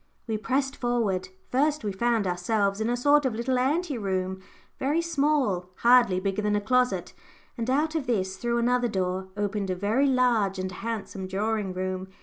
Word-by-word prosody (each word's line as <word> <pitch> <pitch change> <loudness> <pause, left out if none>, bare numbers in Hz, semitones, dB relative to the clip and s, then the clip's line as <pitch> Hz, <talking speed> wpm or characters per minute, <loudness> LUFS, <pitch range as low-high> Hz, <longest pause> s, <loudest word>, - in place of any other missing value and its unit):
We 225 - -2
pressed 270 +4 -1
forward. 215 -7 -1 0.2
First 290 +2 +1
we 205 - -1
found 230 +2 +1
ourselves 200 +3 0
in 220 - 0
a 245 - 0
sort 290 +4 +4
of 255 -4 -1
little 250 +2 0
ante 290 +1 0
room, 190 -1 -2 0.4
very 290 +5 +1
small, 285 - +1
hardly 235 -6 +5
bigger 195 +2 -1
than 210 0 +1
a - - +2
closet, 250 +4 +1 0.4
and 235 0 -3
out 300 +4 +1
of 315 -5 -2
this, 190 -5 0
through 235 +3 -1
another 245 +1 +2
door, 190 -2 -2
opened 205 -1 -2
a 185 - 0
very 215 +9 +1
large 240 -7 +2
and 185 0 -3
handsome 200 -2 -5
drawing 205 +1 -1
room. 185 0 -3
225 Hz, 175 wpm, -26 LUFS, 190-255 Hz, 0.4 s, hardly